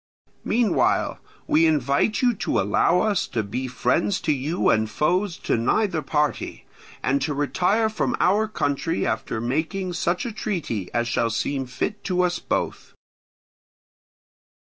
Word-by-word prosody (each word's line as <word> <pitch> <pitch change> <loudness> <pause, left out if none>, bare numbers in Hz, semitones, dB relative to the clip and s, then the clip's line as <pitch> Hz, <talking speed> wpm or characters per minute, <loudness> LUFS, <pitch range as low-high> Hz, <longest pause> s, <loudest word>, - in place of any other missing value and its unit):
Meanwhile 230 -5 +1 0.3
we 160 +2 +4
invite 150 - +1
you 245 -1 +4
to - - 0
allow 105 - +3
us 210 -4 +1
to 115 -4 -2
be 125 +6 -4
friends 130 +10 0
to 155 - +1
you 150 +5 0
and 110 0 +1
foes 175 - 0
to - - +2
neither 170 - +1
party, 150 -1 -1 0.4
and 135 +2 +1
to 145 +1 -1
retire 185 +10 +1
from 220 - -1
our 210 +4 +3
country 165 -3 -1
after 110 - -2
making 160 - -2
such 175 +3 -1
a 240 - -3
treaty 165 - -3
as 120 0 0
shall 115 0 +1
seem 135 +4 -2
fit 165 +11 -3
to 180 -1 +1
us 175 0 0
both." - - -3
160 Hz, 145 wpm, -24 LUFS, 130-190 Hz, 0.4 s, we